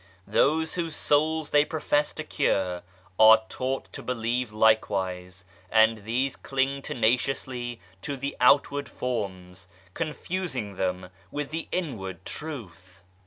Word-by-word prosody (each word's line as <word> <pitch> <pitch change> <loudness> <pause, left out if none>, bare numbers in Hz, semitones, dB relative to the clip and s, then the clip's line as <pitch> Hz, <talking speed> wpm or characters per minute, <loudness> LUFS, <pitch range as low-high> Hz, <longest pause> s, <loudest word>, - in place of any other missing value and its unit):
Those 155 +9 +2
whose 165 -3 -2
souls 155 +1 +1
they 145 0 +6
profess 150 -1 0
to - - -5
cure 90 -2 0 0.4
are 110 0 +8
taught 130 +1 -3
to - - -6
believe 120 -1 -1
likewise, 95 -4 +1 0.2
and 110 0 +4
these 125 +4 0
cling 135 +1 -1
tenaciously 120 0 -1 0.2
to 140 -1 -4
the 140 +2 -4
outward 140 +2 +4
forms, 95 -7 -4 0.3
confusing 155 - -3
them 90 0 -2 0.2
with 145 0 -4
the 160 +1 -4
inward 95 - -4
Truth. 95 - -8
125 Hz, 120 wpm, -27 LUFS, 100-145 Hz, 0.4 s, are